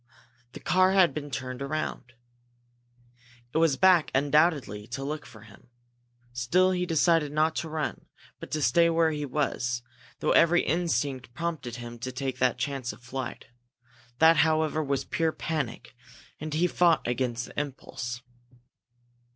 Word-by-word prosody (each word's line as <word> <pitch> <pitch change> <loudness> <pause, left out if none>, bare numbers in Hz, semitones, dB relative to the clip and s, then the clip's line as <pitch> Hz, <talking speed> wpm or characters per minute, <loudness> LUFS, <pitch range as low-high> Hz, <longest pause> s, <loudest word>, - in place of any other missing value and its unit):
The - - -8
car 185 +1 +3
had 190 -3 +5
been 145 -1 -5
turned 130 -1 -5
around. 140 -3 -4 1.4
It 160 - +2
was 160 -5 +3
back, 180 0 +5
undoubtedly, 140 - +2
to 130 +3 -5
look 150 +1 -5
for 110 - -14
him. 110 +3 -17 0.6
Still 170 +10 +2
he 180 -1 -1
decided 165 -2 +2
not 155 +1 +1
to 160 - -3
run, 155 0 -4 0.3
but - - -9
to 155 -1 -2
stay 170 +2 +4
where 165 -1 +3
he 150 -1 -3
was, 120 -4 -1 0.3
though - - 0
every 170 +1 +5
instinct 145 -7 -1
prompted 160 -8 -4
him 120 -1 -8
to 130 +2 -4
take 130 0 -4
the 125 -2 +3
chance 130 -1 -3
of - - -15
flight. 130 0 -6 0.7
That, 160 +2 +6
however, 155 0 +2
was 140 -1 -1
pure 165 -1 0
panic, 150 -8 -4 0.5
and 155 +1 -5
he 160 +4 +2
fought 175 -4 +3
against 120 -1 -1
the - - -6
impulse. 120 -4 -6
145 Hz, 150 wpm, -27 LUFS, 125-165 Hz, 1.4 s, That